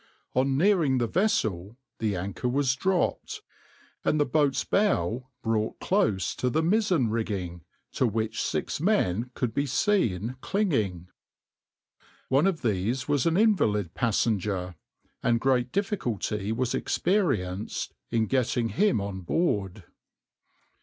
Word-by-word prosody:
On 135 +1 +2
nearing 165 -6 +3
the 120 - +1
vessel 110 - 0 0.2
the 110 -3 0
anchor 100 +7 -3
was 130 0 +1
dropped, 185 +5 -1 0.6
and 155 - +1
the 145 - +3
boat's 140 0 +1
bow 130 - 0
brought 110 -1 -1
close 110 - +1
to 125 - 0
the 160 +6 +1
mizzen 180 - +2
rigging, 95 -6 -3 0.3
to 130 - +1
which 110 0 -2
six - - -2
men 125 - +1
could 125 -3 -2
be 140 +1 0
seen 125 - 0
clinging. 110 - -1 1.2
One 140 +7 +4
of 170 -6 -1
these 115 +5 0
was 145 0 +1
an 165 +1 +2
invalid 105 - +2
passenger, 100 -5 0 0.5
and 115 0 +2
great 125 0 +1
difficulty 115 - -2
was 125 +2 -1
experienced 110 - -1 0.2
in 115 -1 +1
getting 120 -1 0
him 205 - +2
on 100 -1 -4
board. 100 - -1
125 Hz, 125 wpm, -27 LUFS, 105-160 Hz, 1.2 s, One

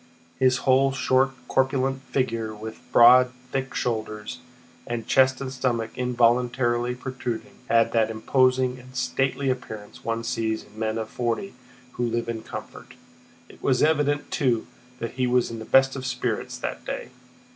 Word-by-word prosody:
His 130 0 +4
whole 135 +1 +4
short 130 0 +2 0.2
corpulent 130 0 +1
figure 115 -5 -2
with 110 +1 -8
broad 125 +1 +7 0.2
thick 135 -1 -3
shoulders, 110 -1 -3 0.5
and 120 -1 -3
chest 130 0 +4
and 135 -1 -5
stomach 120 -4 -1
involuntarily 120 0 +1
protruding, 130 -1 -5 0.2
had 115 0 +4
that 115 -1 +2
imposing 130 +3 +2
and 130 +1 -15
stately 135 +1 0
appearance 110 -5 -7
one 115 0 -2
sees 115 -2 -1
in 110 - -15
men 110 0 -1
of 110 -1 -3
forty 120 - -2 0.4
who 120 - -3
live 115 0 -1
in 115 -1 -3
comfort. - - -9 0.5
It - - -17
was 130 -2 +2
evident, 145 -2 +1
too, 125 -5 +1 0.3
that 115 -2 -4
he 125 -1 -1
was 125 -1 +2
in 115 - -6
the 110 - -7
best 135 0 +4
of 130 -1 -4
spirits 125 -3 -2
that - - -5
day. - - -5
125 Hz, 155 wpm, -25 LUFS, 115-130 Hz, 0.5 s, broad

